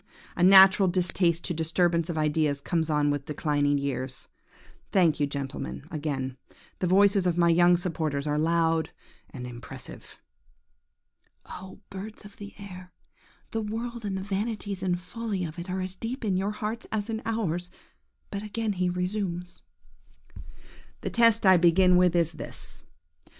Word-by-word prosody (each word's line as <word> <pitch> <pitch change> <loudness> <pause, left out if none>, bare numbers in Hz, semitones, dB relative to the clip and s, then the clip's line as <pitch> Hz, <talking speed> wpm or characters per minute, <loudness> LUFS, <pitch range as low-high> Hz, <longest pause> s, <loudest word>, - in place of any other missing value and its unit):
A - - -3
natural 190 +1 +8
distaste 175 -1 +1
to 175 - -2
disturbance 170 +1 +1
of 165 - -3
ideas 150 -2 +1
comes 160 +2 -1
on 150 -1 +2
with 145 -1 -3
declining 145 -1 +1
years. 130 -2 -4 0.6
Thank 170 -6 +3
you, 145 - +2
gentlemen, 135 - -5
again; 135 -4 -3 0.4
the 180 - 0
voices 195 +1 +4
of 175 -1 0
my 170 -1 +4
young 175 +1 +5
supporters 155 -5 -2
are 150 0 0
loud 165 0 +2 0.4
and 125 -3 -8
impressive. 120 -1 -10 1.3
–Oh, 190 +2 -10
birds 210 +3 -8
of 205 - -13
the 205 0 -10
air, 185 -3 -10 0.6
the 225 - -1
world 230 +2 -4
and 195 -2 -2
the 190 - -4
vanities 205 -1 -3
and 180 -2 0
follies 200 -1 -4
of 160 +2 -9
it 175 +2 -7
are 185 +1 -2
as 185 0 -4
deep 235 +4 -4
in 195 -3 +1
your 190 +2 0
hearts 215 +2 -4
as 210 -1 -2
in 225 -1 -3
ours! 180 -6 -2 0.6
But 200 - -3
again 215 +1 -2
he 180 -1 0
resumes– 180 -1 -3 1.4
"The - - -3
test 230 -2 +4
I 190 -1 +7
begin 180 +2 +5
with 180 -1 +4
is 170 -1 +3
this. - - -8
180 Hz, 155 wpm, -27 LUFS, 160-200 Hz, 1.4 s, natural